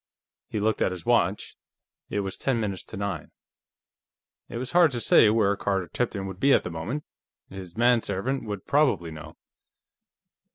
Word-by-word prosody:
He 105 - -3
looked 110 +1 0
at - - +3
his 90 -2 -7
watch. 105 -5 +1 0.5
It 105 - -1
was 95 -1 -4
ten 130 -4 -1
minutes 100 -4 -3
to - - -8
nine. 100 -5 -4 1.2
It - - -5
was 125 +1 -4
hard 175 -2 +6
to 120 - -2
say 110 - +6
where 105 -2 +3
Carter 95 -2 -1
Tipton 105 -5 -2
would 95 -1 -7
be 140 +3 +4
at - - +4
the 85 - -5
moment; 105 - -4 0.5
his 95 -1 -9
manservant 120 +1 +1
would 105 -3 -5
probably 115 - +2
know. 80 0 -10
100 Hz, 165 wpm, -26 LUFS, 95-120 Hz, 1.2 s, hard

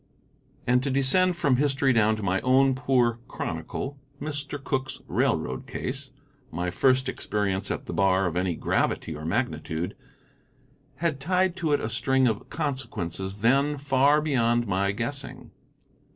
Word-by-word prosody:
And 125 +1 +3
to 140 - -2
descend 140 +8 +3
from 145 -7 +2
history 135 -1 +2
down 110 -1 +3
to 110 - -6
my 95 0 +1
own 130 +1 +4
poor 125 -3 +1
chronicle, 140 +1 -5 0.2
Mr. 145 -1 -4
Cooke's 130 -1 -2
railroad 65 +1 0
case, - - -4 0.4
my 90 +2 -3
first 130 +5 +3
experience 100 -5 -1
at - - -3
the - - -5
bar 95 0 +3
of 85 -2 -2
any 90 -1 0
gravity 80 0 -1
or 75 +1 -7
magnitude, 85 -3 -2 1.0
had 160 -5 -1
tied 180 +4 +1
to 160 -4 -1
it 145 - +3
a - - -3
string 130 +3 +2
of 110 -3 -2
consequences 100 - -4
then 140 +5 +3
far 140 +2 +3
beyond 120 -5 +2
my 100 -1 +1
guessing. 120 +7 -5
130 Hz, 145 wpm, -26 LUFS, 100-140 Hz, 1.0 s, own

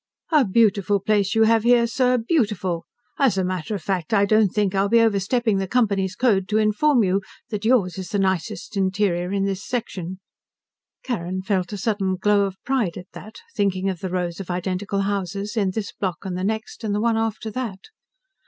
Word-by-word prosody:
"A 305 -3 +5
beautiful 205 -1 +2
place 200 0 +1
you 225 - +5
have 225 0 +4
here, 240 +1 +4
sir. 250 +1 +2
Beautiful! 210 - 0 0.3
As 260 -9 +3
a 190 - +2
matter 185 +2 -3
of 190 - -6
fact, 185 +1 -1
I 200 -1 +4
don't 215 +1 +4
think 205 0 0
I'll 195 +1 +1
be 230 +2 +5
overstepping 220 0 +2
the 190 - -2
company's 200 -5 +1
code 200 -6 +2
to 215 - +2
inform 220 +5 +3
you 190 +1 +1 0.3
that 210 -1 -4
yours 205 -7 +2
is 185 -2 -6
the 205 - -1
nicest 190 +1 -1
interior 190 -2 0
in 195 -1 0
this 195 -1 -3
section." 190 -7 -4 0.8
Carrin 185 -6 -3
felt 190 -1 -1
a 205 - -4
sudden 195 -2 0
glow 200 +1 +2
of 195 -1 -5
pride 245 -9 0
at 180 0 -10
that, 215 +1 -11
thinking 195 -1 0
of 180 - -7
the 190 - -4
rows 175 -1 -2
of 195 - -7
identical 185 +2 -2
houses, 200 +1 -3
on 200 -4 +1
this 200 +2 -4
block 185 -2 -4
and 185 -2 -3
the 185 - -3
next, 220 +3 -3
and 205 -2 -1
the - - 0
one 230 0 +2
after 225 0 -2
that. 215 -5 -4
200 Hz, 200 wpm, -23 LUFS, 185-220 Hz, 0.8 s, A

